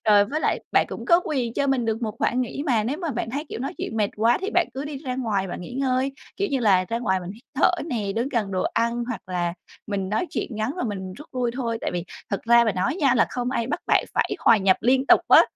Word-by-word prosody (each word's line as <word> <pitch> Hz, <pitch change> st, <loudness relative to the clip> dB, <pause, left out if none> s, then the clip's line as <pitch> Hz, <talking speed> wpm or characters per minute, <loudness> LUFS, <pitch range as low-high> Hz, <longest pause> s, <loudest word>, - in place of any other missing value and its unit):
Rồi, 205 Hz, -1 st, +6 dB
với 295 Hz, +9 st, -3 dB
lại -, -, +1 dB
bạn -, -, +4 dB
cũng -, -, -6 dB
có 345 Hz, -2 st, +6 dB
quyền 250 Hz, -6 st, -2 dB
cho 280 Hz, -, +1 dB
mình 270 Hz, -3 st, +1 dB
được 225 Hz, +1 st, -1 dB
một 215 Hz, -2 st, -2 dB
khoảng 250 Hz, -, +1 dB
nghỉ 255 Hz, +3 st, -3 dB
mà, 230 Hz, -6 st, +2 dB
nếu 265 Hz, +6 st, -1 dB
mà 335 Hz, -5 st, -2 dB
bạn 230 Hz, -2 st, -3 dB
thấy, 285 Hz, +5 st, -3 dB
kiểu, -, -, -5 dB
nói 270 Hz, -, -3 dB
chuyện 225 Hz, -, -4 dB
mệt 210 Hz, -2 st, +1 dB
quá 225 Hz, +3 st, +3 dB
thì 390 Hz, +3 st, -2 dB
bạn 355 Hz, -1 st, +4 dB
cứ 270 Hz, +2 st, -4 dB
đi 295 Hz, -1 st, -5 dB
ra 265 Hz, -2 st, -4 dB
ngoài 210 Hz, -7 st, -1 dB
bạn -, -, -5 dB
nghỉ 175 Hz, -, -8 dB
ngơi, 265 Hz, 0 st, 0 dB, 0.2 s
kiểu 400 Hz, -, 0 dB
như 270 Hz, -3 st, 0 dB
là 190 Hz, -5 st, +4 dB
ra 230 Hz, -, -1 dB
ngoài 190 Hz, -6 st, 0 dB
mình 180 Hz, 0 st, -7 dB
hít 220 Hz, +4 st, -16 dB
thở 280 Hz, -, +4 dB, 0.2 s
nè, 210 Hz, -8 st, -2 dB
đứng 235 Hz, +4 st, 0 dB
gần 230 Hz, -7 st, -1 dB
đồ 185 Hz, -, 0 dB
ăn, 235 Hz, +1 st, +1 dB
hoặc 235 Hz, -5 st, -4 dB
là 175 Hz, -2 st, -1 dB, 0.3 s
mình 195 Hz, -2 st, -2 dB
nói 215 Hz, -, 0 dB
chuyện -, -, -2 dB
ngắn 220 Hz, +3 st, -1 dB
và 360 Hz, -, -2 dB
mình 190 Hz, -4 st, -4 dB
rút 295 Hz, +10 st, -12 dB
lui 245 Hz, -2 st, 0 dB
thôi. 230 Hz, -3 st, -2 dB
Tại -, -, -2 dB
vì 175 Hz, -1 st, -2 dB, 0.3 s
thật 200 Hz, -, -1 dB
ra 235 Hz, +1 st, +6 dB
mà 220 Hz, -, +1 dB
nói 185 Hz, -, -1 dB
nha, 275 Hz, -8 st, +3 dB
là 235 Hz, -, +4 dB
không 245 Hz, 0 st, -2 dB
ai 235 Hz, -3 st, -1 dB
bắt 275 Hz, -, -2 dB
bạn -, -, +3 dB
phải -, -, +1 dB
hòa 230 Hz, -, +5 dB
nhập 190 Hz, -2 st, +3 dB
liên 260 Hz, +3 st, +3 dB
tục -, -, +7 dB
á. -, -, +9 dB
235 Hz, 285 wpm, -24 LUFS, 210-265 Hz, 0.3 s, á